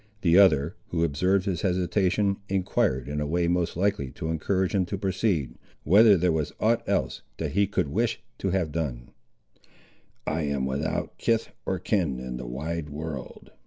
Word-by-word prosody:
The 85 -2 +4
other, 85 -3 +5
who 85 -4 -1
observed 90 +5 +1
his 90 -4 -1
hesitation, 95 +2 +1
enquired 90 -9 0
in 75 +1 -2
a 75 - -1
way 85 +2 +1
most 85 -1 0
likely 95 -8 0
to 80 +1 -5
encourage 95 +3 0
him 100 -2 +3
to 100 - -3
proceed, 95 - 0 0.3
whether 100 +4 +6
there 90 +1 +2
was 80 -2 -1
aught 115 +1 +2
else - - 0 0.2
that - - -3
he 100 +1 +2
could 95 - 0
wish 115 +9 0 0.2
to 95 - -1
have 90 -4 0
done. 70 -7 -4 1.1
"I 80 - -1
am 70 -3 -1
without 70 +4 -3
kith 115 -1 +1 0.2
or 95 - 0
kin 85 - 0
in 65 -1 -5
the - - -7
wide 75 +5 -4
world!" 75 -3 -7
85 Hz, 170 wpm, -26 LUFS, 75-95 Hz, 1.1 s, whether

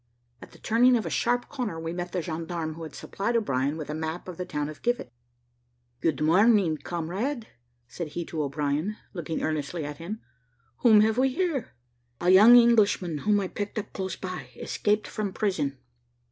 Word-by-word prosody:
At - - -11
the - - -16
turning 245 +3 +4
of 225 - -3
a - - -3
sharp 245 +1 +1
corner 235 - -4
we 165 +1 -4
met 175 0 -4
the 180 -2 -2
gendarme 165 0 -4
who 165 - -10
had 155 -3 -8
supplied 230 +5 -3
O'Brien 140 - 0
with 155 - -5
a 150 - -4
map 160 +3 -4
of 180 -3 -7
the 180 - -4
town 150 -3 -2
of 155 0 -9
Givet, 240 - -1 0.9
"Good 155 0 0
morning, 190 0 +4
comrade," 195 - -3 0.4
said 165 +7 -5
he 170 +3 -5
to 160 -1 -3
O'Brien, 150 +7 -1 0.2
looking 165 -3 -4
earnestly 155 +1 -2
at 145 0 -6
him, 200 +7 -5 0.6
"whom 215 - +6
have 220 +2 +2
we 265 +1 +4
here?" 290 -4 -2 0.4
"A 175 +1 +3
young 215 +6 +9
Englishman, 210 -9 +4
whom 210 +5 +2
I 195 - -1
picked 205 +3 -5
up 210 -1 -4
close 190 -2 -3
by, 185 -1 -6
escaped 210 0 0
from 205 -3 -3
prison." 150 -10 -1
180 Hz, 185 wpm, -27 LUFS, 160-215 Hz, 0.9 s, young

